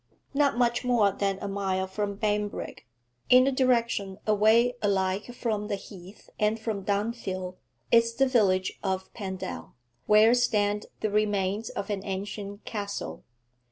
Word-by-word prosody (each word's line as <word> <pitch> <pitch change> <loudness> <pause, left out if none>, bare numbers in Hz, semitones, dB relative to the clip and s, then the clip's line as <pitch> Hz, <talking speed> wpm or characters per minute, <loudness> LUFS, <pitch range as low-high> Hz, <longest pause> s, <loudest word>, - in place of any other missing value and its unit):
Not 280 -3 +2
much 240 -1 +2
more 235 -5 +3
than 195 0 -1
a - - -2
mile 195 -1 -1
from 200 +1 -3
Banbrigg, 210 - -2 0.4
in 255 +1 +7
a 275 - +2
direction 235 -7 +1
away 220 +3 +4
alike 195 +2 0
from 215 -4 -2
the 205 - -1
Heath 190 0 -12
and 215 +1 +1
from 220 -3 -3
Dunfield, 200 -3 -2 0.3
is 230 0 +4
the 270 - +4
village 190 -7 +2
of 190 -1 -3
Pendal, 190 - -6 0.3
where 215 +2 +6
stand 210 -4 +1
the 215 - 0
remains 205 0 0
of 200 +2 -4
an 195 -1 -3
ancient 200 +1 -5
castle. 200 -2 -5
205 Hz, 140 wpm, -27 LUFS, 195-230 Hz, 0.4 s, in